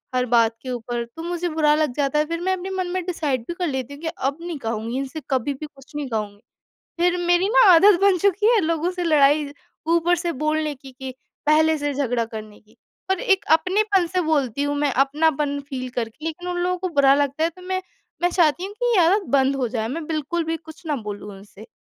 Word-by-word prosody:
हर 250 0 +2
बात 230 -1 +3
के 255 - -7
ऊपर, 240 0 -3
तो 325 +8 -10
मुझे 350 0 -2
बुरा 305 -1 +3
लग 305 -5 0
जाता 290 0 +1
है 305 - +2
फिर 335 0 -3
मैं 375 +1 +1
अपने 375 +1 -4
मन 375 -1 -2
में 370 -1 -2
डिसाइड 300 -8 -1
भी 345 - -3
कर 355 0 -2
लेती 265 -1 -4
हूँ 285 - -12
कि 325 - -4
अब 280 -3 -2
नहीं 340 -3 -5
कहूँगी 225 +2 -3
इनसे 275 +3 -5
कभी 265 +1 0
भी 305 +3 -7
कुछ 280 +1 -19
नहीं 290 -2 -3
कहूँगी। 210 -2 -4 0.6
फिर 355 0 +3
मेरी 350 +3 +3
ना, - - +4
आदत 360 +2 +7
बन 395 -2 +4
चुकी 400 +3 +2
है 435 - +4
लोगों 330 +2 0
से 360 -1 -3
लड़ाई 295 -2 +4 0.4
ऊपर 340 +1 +3
से 340 0 -2
बोलने 305 -1 0
की, 270 0 -13
कि 260 0 -8 0.3
पहले 315 +1 +4
से 290 0 -2
झगड़ा 245 -4 0
करने 215 -2 -9
की। 215 - -27 0.3
और 380 - +1
एक 385 -1 +2
अपनेपन 385 +1 +1
से 365 +2 -1
बोलती 285 -5 0
हूँ, 290 0 -1
मैं 285 -2 +1
अपनापन 285 +1 +1
फ़ील 255 -2 -4
करके 245 +5 -5
लेकिन 355 +3 -5
उन 355 - -2
लोगों 360 +1 0
को 370 0 -2
बुरा 275 0 +6
लगता 285 +2 0
है 335 - +1
तो 365 +2 -16
मैं, 370 0 -2 0.4
मैं 355 - +3
चाहती 345 0 +2
हूँ, 405 - -9
कि 485 +1 0
ये 350 - +5
आदत 395 +3 +2
बंद 270 +1 +2
हो 250 -3 -1
जाए 220 -1 -2
मैं 310 +4 -5
बिल्कुल 320 +2 -2
भी 325 +1 -2
कुछ 320 +1 -14
ना 295 -2 0
बोलूँ 210 -2 -7
उनसे। 205 +2 -14
305 Hz, 235 wpm, -22 LUFS, 265-350 Hz, 0.6 s, आदत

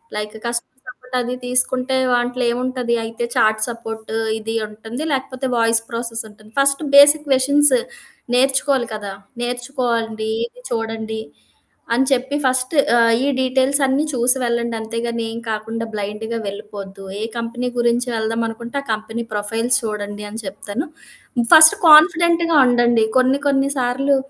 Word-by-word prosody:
Like 210 0 -4
customer 240 +2 -5
support 255 -4 -10
అది 245 +1 -3
తీసుకుంటే 255 +1 0 0.2
దాంట్లో 245 +1 0
ఏముంటది? 250 -1 -1
అయితే 230 +1 -4
చాట్ 215 0 +3
సపోర్టు 225 -1 -6 0.2
ఇది 225 +1 -5
ఉంటుంది. 220 +6 -7
లేకపోతే 265 0 -3
వాయిస్ 230 0 +3
ప్రాసెస్ 230 -1 -4
ఉంటుంది. 215 +1 -19
ఫ‌స్ట్ 275 +2 +2
బేసిక్ 295 +1 +7
క్వషన్స్ 285 - +4 0.6
నేర్చుకోవాలి 265 0 +2
కదా! 205 -2 -6 0.3
నేర్చుకోండి 240 -3 -2 0.2
ఇది 250 +1 -19
చూడండి. 225 -1 -3 0.7
అని 255 +3 +2
చెప్పి 265 +2 0
ఫస్ట్ 255 0 +1 0.2
ఆహ్, 230 -1 +4
ఈ - - +1
డీటెయిల్స్ 260 +2 +2
అన్ని 270 +2 +1
చూసి 250 0 +2
వెళ్ళండి. 235 -1 -1
అంతేగాని 230 +1 -3
ఏ - - -7 0.2
కాకుండా 225 +1 -3
బ్లైండ్‌గా 210 +2 -4
వెళ్లిపోవద్దు. 200 -1 -8 0.2
ఏ 215 - -3
కంపెనీ 235 +2 -3
గురించి 240 +1 +1
వెళ్దాం 225 +1 -1
అనుకుంటే, 235 +3 -6
ఆ - - -20
కంపెనీ 220 +2 -4
ప్రొఫైల్స్ 225 +4 0
చూడండి 210 -1 -5
అని 220 +2 -7
చెప్తాను. 205 - -5 0.7
ఫస్ట్ 315 +3 +9
కాన్ఫిడెంట్‌గా 335 +1 +6
ఉండండి. 240 -2 +3
కొన్ని 260 +2 +3
కొన్ని 275 0 +2
సార్లు 265 +3 +1
240 Hz, 135 wpm, -19 LUFS, 225-260 Hz, 0.7 s, ఫస్ట్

